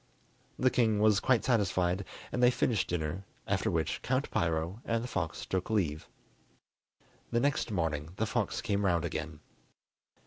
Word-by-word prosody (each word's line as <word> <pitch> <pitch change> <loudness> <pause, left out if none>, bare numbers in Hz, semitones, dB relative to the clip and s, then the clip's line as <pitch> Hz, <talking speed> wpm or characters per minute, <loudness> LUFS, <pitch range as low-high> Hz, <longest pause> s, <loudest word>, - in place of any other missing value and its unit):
The 130 0 +3
king 110 -4 +3
was 105 -1 +4
quite 130 -1 +2
satisfied, 95 -5 +1 0.3
and 125 - -1
they 125 - +7
finished 120 -4 +1
dinner, 85 +2 -2 0.2
after - - 0
which - - -1
Count 130 +2 -1
Piro 85 +5 -1
and 115 0 -1
the - - -4
fox 90 -9 -3
took 95 +2 -2
leave. 85 -9 0 1.2
The 120 - +1
next 140 -1 +1
morning 80 -5 -2
the 110 - 0
fox 115 -2 -1
came 100 -1 0
round 85 -3 +2
again. 75 -2 -4
100 Hz, 150 wpm, -31 LUFS, 85-115 Hz, 1.2 s, they